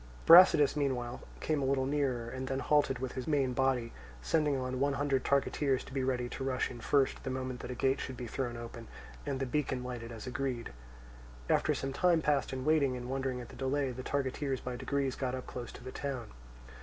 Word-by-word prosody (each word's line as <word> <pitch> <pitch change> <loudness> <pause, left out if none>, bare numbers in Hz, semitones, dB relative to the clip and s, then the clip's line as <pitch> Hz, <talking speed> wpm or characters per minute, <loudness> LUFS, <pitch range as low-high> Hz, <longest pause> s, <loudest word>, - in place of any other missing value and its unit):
Brasidas 165 -5 +8
meanwhile 125 -4 -1 0.2
came 155 -2 0
a - - 0
little 130 0 +1
nearer 135 -4 0
and 130 +2 -5
then 135 +1 -1
halted 145 -1 +2
with 130 0 -4
his 130 - -5
main 140 -4 +2
body, 130 -2 +1 0.3
sending 150 - +1
on 130 0 -3
one 140 +1 +2
hundred 140 -1 0
targeteers 140 -1 +1
to - - -12
be 135 -1 0
ready 125 -2 0
to 135 - -5
rush 130 -1 -1
in 120 - -9
first, 140 +1 +1
the 135 - -3
moment 130 -1 -3
that - - -7
a 125 - -4
gate 135 +2 +1
should 130 -2 -5
be 125 - -5
thrown 120 0 -3
open 115 -1 -8 0.4
and 130 - -1
the 135 - 0
beacon 130 -1 -1
lighted 120 -2 -6
as 115 -2 -8
agreed. 125 - -3 0.8
After - - +3
some 135 0 -3
time 175 +2 +3
passed 145 -2 +1
in 130 0 -4
waiting 145 -5 +3
and 125 +1 -6
wondering 130 -2 -2
at 120 - -10
the - - -11
delay, 135 0 0
the 125 +1 -6
targeteers 135 0 -1
by 125 -1 -5
degrees 140 +1 -1
got 130 -1 -2
up 130 - -6
close 120 -1 -6
to - - -11
the 130 - -7
town. 130 -6 -4
130 Hz, 220 wpm, -32 LUFS, 125-140 Hz, 0.8 s, Brasidas